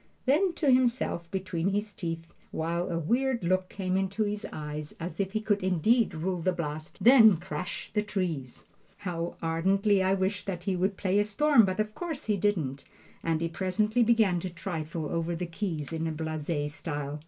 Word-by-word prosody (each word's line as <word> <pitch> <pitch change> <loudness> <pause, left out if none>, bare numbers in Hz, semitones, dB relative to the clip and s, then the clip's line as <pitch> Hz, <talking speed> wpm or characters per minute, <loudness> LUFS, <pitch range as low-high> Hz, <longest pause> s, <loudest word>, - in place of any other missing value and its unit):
Then 335 +8 +3
to 300 -5 +2
himself 245 -9 +1
between 185 -2 -1
his 205 +1 -2
teeth, 165 -2 -4 0.2
while 170 +3 -2
a 170 - -1
weird 240 - +1
look 185 +1 +1
came 185 -2 -2
into 195 +3 0
his 210 0 -3
eyes 150 0 -6
as 175 +4 -6
if 195 0 -1
he 215 - 0
could 210 -2 +1
indeed 190 +4 +2
rule 175 +2 -2
the 185 - +2
blast, 155 -2 -5
"Then 225 -6 +8
crash 175 +2 -5
the 210 - +2
trees!" 175 -11 -3 0.3
How 175 -4 -4
ardently 190 +5 +2
I 190 +1 +3
wished 190 +1 -1
that 180 -3 -3
he 190 0 0
would 190 +2 0
"play 195 +1 +2
a - - +4
storm," 235 +3 +4
but 185 +1 -2
of 215 0 0
course 325 -2 -5
he 210 - +2
didn't, 170 -9 0 0.4
and 165 -1 0
he 165 - +1
presently 210 +7 0
began 220 -6 +4
to 185 - -4
trifle 165 -3 -4
over 165 +2 -1
the 180 +2 -3
keys 165 -4 -4
in 165 0 -1
a - - -1
blase 155 -1 -3
style. 145 -2 -4
185 Hz, 190 wpm, -29 LUFS, 165-210 Hz, 0.4 s, Then